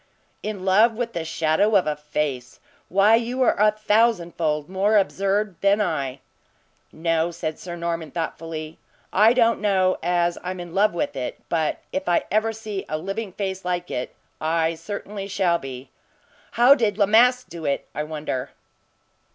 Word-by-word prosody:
"In 205 Hz, -3 st, -5 dB
love 215 Hz, +5 st, +5 dB
with 235 Hz, 0 st, -3 dB
the 170 Hz, -, -3 dB
shadow 160 Hz, +6 st, +1 dB
of 190 Hz, -, +4 dB
a 150 Hz, -, -1 dB
face! 150 Hz, -4 st, -4 dB, 0.3 s
Why, 200 Hz, +4 st, +4 dB
you 240 Hz, +3 st, 0 dB
are -, -, +3 dB
a 210 Hz, -, +6 dB
thousandfold 190 Hz, -8 st, +1 dB
more 195 Hz, +4 st, +2 dB
absurd 195 Hz, -1 st, 0 dB
than 200 Hz, +1 st, +3 dB
I." 140 Hz, -9 st, -2 dB, 0.7 s
"No," 165 Hz, 0 st, 0 dB
said 160 Hz, -2 st, -5 dB
Sir 175 Hz, -1 st, -7 dB
Norman, 170 Hz, -2 st, -3 dB
thoughtfully, 165 Hz, -1 st, -5 dB, 0.3 s
"I 215 Hz, +4 st, +6 dB
don't 230 Hz, -2 st, +3 dB
know 190 Hz, -3 st, +2 dB
as 175 Hz, 0 st, +1 dB
I'm 185 Hz, 0 st, -4 dB
in 175 Hz, -1 st, -8 dB
love 200 Hz, -1 st, +2 dB
with -, -, -2 dB
it; 130 Hz, -2 st, -4 dB
but 160 Hz, -2 st, -1 dB
if 190 Hz, -, 0 dB
ever 215 Hz, +5 st, +1 dB
I -, -, -1 dB
see 215 Hz, -3 st, -5 dB
a 155 Hz, -, -1 dB
living 195 Hz, +5 st, -4 dB
face 190 Hz, -1 st, -4 dB
like 180 Hz, 0 st, -3 dB
it, 125 Hz, -, -4 dB, 0.3 s
I 160 Hz, +1 st, +1 dB
certainly 200 Hz, +3 st, -6 dB
shall 185 Hz, -4 st, +1 dB
be. 130 Hz, -1 st, -9 dB, 0.6 s
How 240 Hz, +4 st, +7 dB
did 220 Hz, -7 st, 0 dB
La 205 Hz, -, +4 dB
Masque 250 Hz, +4 st, +4 dB
do 165 Hz, -2 st, -8 dB
it, 140 Hz, -1 st, -1 dB
I -, -, -3 dB
wonder?" 150 Hz, -4 st, -4 dB
185 Hz, 165 wpm, -23 LUFS, 160-210 Hz, 0.7 s, How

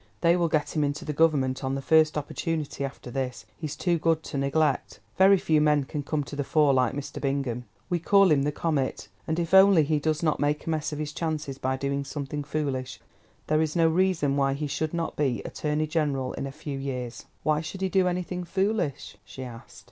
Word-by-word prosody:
"They 170 Hz, 0 st, +5 dB
will 175 Hz, -1 st, +2 dB
get 155 Hz, 0 st, -1 dB
him 150 Hz, -, +2 dB
into 145 Hz, +1 st, -2 dB
the 150 Hz, -, -2 dB
Government 140 Hz, -4 st, +2 dB
on 135 Hz, 0 st, -1 dB
the -, -, -2 dB
first 155 Hz, 0 st, +4 dB
opportunity 150 Hz, 0 st, -3 dB
after 135 Hz, -2 st, -6 dB
this; 125 Hz, -8 st, -3 dB
he's 155 Hz, -2 st, -5 dB
too 170 Hz, +1 st, 0 dB
good 160 Hz, 0 st, +1 dB
to -, -, -5 dB
neglect. 140 Hz, 0 st, 0 dB, 0.2 s
Very 195 Hz, +1 st, +6 dB
few 155 Hz, -4 st, +2 dB
men 150 Hz, -1 st, +3 dB
can 145 Hz, +2 st, -4 dB
come 145 Hz, +1 st, -2 dB
to 145 Hz, -, -8 dB
the 145 Hz, -, -1 dB
fore 150 Hz, -1 st, +3 dB
like 130 Hz, -2 st, +2 dB
Mr. 145 Hz, -1 st, -6 dB
Bingham. 135 Hz, -3 st, -1 dB, 0.2 s
We 175 Hz, -, 0 dB
call 195 Hz, +1 st, +5 dB
him 145 Hz, -2 st, +4 dB
the 145 Hz, +2 st, 0 dB
comet, 150 Hz, -3 st, -2 dB, 0.2 s
and 160 Hz, 0 st, -1 dB
if 170 Hz, 0 st, -2 dB
only 190 Hz, -4 st, +7 dB
he 150 Hz, +1 st, +1 dB
does 155 Hz, +2 st, -1 dB
not 155 Hz, -2 st, +1 dB
make 145 Hz, +1 st, 0 dB
a 165 Hz, -, -1 dB
mess 155 Hz, 0 st, -1 dB
of 150 Hz, -, -4 dB
his 150 Hz, 0 st, -4 dB
chances 150 Hz, -4 st, -3 dB
by 130 Hz, 0 st, -1 dB
doing 140 Hz, +1 st, -1 dB
something 145 Hz, +1 st, -4 dB
foolish, 140 Hz, -3 st, -3 dB, 0.5 s
there 155 Hz, +1 st, +2 dB
is 155 Hz, 0 st, -1 dB
no 165 Hz, -1 st, +4 dB
reason 165 Hz, -4 st, +2 dB
why 135 Hz, -1 st, +2 dB
he 150 Hz, +2 st, -3 dB
should 150 Hz, +3 st, -2 dB
not 165 Hz, -1 st, -2 dB
be 130 Hz, -8 st, 0 dB
Attorney 150 Hz, 0 st, -1 dB
General 145 Hz, -5 st, -1 dB
in 135 Hz, -, -4 dB
a -, -, -6 dB
few 140 Hz, 0 st, -6 dB
years." 125 Hz, -3 st, -5 dB, 0.2 s
"Why 155 Hz, 0 st, +2 dB
should 165 Hz, +4 st, -7 dB
he 190 Hz, -, +1 dB
do 190 Hz, -1 st, +3 dB
anything 180 Hz, 0 st, -2 dB
foolish?" 190 Hz, -, -1 dB
she 130 Hz, +5 st, -9 dB
asked. 120 Hz, -2 st, -10 dB
150 Hz, 220 wpm, -27 LUFS, 140-160 Hz, 0.5 s, only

